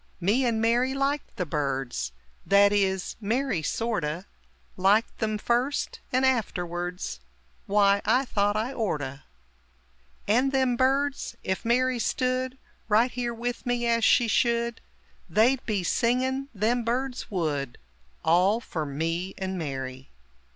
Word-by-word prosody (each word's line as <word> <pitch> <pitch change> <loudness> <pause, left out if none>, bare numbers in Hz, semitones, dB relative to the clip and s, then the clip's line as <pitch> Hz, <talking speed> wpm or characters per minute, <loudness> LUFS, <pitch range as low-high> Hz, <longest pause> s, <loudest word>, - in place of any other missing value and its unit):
Me 220 +9 +2
and 225 -2 +1
Mary 240 +4 +2
liked 275 +1 -1
the 180 - -2
birds 135 - -2 0.3
That 200 +1 +5
is, 190 -2 0
Mary 225 -3 0
sorto' 180 -4 -2 0.5
Liked 200 +5 +2
them 215 -1 0
first, 245 +6 -1
and 255 +1 +2
afterwerds 180 - -2 0.5
W'y 200 0 +4
I 265 +2 +3
thought 205 -3 +1
I 230 +5 -2
orto. 145 - -2 1.1
And 250 +6 +3
them 260 -2 +2
birds 270 +3 +1
ef 190 0 -1
Mary 250 +1 +2
stood 255 +2 -1 0.3
Right 225 +4 +4
here 245 -1 -2
with 245 +2 -4
me 245 -1 0
as 230 -1 +2
she 240 +1 +5
should 235 +1 +1 0.5
They'd 245 +5 +3
be 205 -4 0
singin', 260 +7 0
them 235 +3 0
birds 250 +2 -2
would 145 - -2 0.5
All 185 +7 +4
fer 160 -9 -4
me 165 +6 -2
and 190 -1 -3
Mary! 135 -5 -5
220 Hz, 130 wpm, -27 LUFS, 180-250 Hz, 1.1 s, That